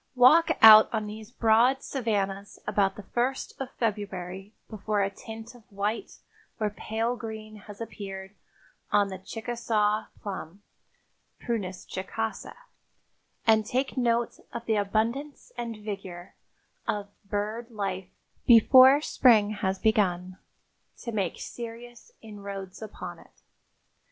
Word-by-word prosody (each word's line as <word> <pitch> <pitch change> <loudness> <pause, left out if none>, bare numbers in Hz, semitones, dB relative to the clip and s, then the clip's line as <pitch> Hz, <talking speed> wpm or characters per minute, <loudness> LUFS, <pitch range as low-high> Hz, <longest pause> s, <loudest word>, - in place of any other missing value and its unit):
Walk 260 +7 +6
out 215 -1 +11
on 215 -2 -1
these 215 +1 -8
broad 240 +3 +3
savannas 205 -6 -2
about 195 -1 +1
the 210 - -9
first 245 +6 -2
of 265 - -4
February 195 -3 -3 0.2
before 215 -1 -2
a 195 - -1
tint 225 +3 -10
of 245 - -16
white 205 +3 -3 0.4
or 210 -1 0
pale 225 +3 -2
green 220 -2 -8
has 205 0 -12
appeared 195 -3 -7 0.6
on 205 -1 +3
the 190 -1 -7
chicasaw 220 0 -1
plum 195 -1 -7 0.8
(Prunus 195 -6 -4
chicasa) 220 +4 -4 0.9
and 220 -2 +5
take 255 +4 -1
note 235 -2 0
of 235 0 -6
the 220 - +1
abundance 225 +8 -1
and 235 -2 -5
vigor 190 -4 -7 0.5
of 205 -1 -2 0.2
bird 215 +3 -3
life 195 -4 -4 0.4
before 260 +4 +8
spring 220 -8 +4
has 195 -2 -1
begun 185 -4 +1 0.6
to 235 - -6
make 195 -6 -2
serious 240 - -9
inroads 200 -3 -8
upon 180 -5 -8
it. - - -21
215 Hz, 120 wpm, -27 LUFS, 200-235 Hz, 0.9 s, out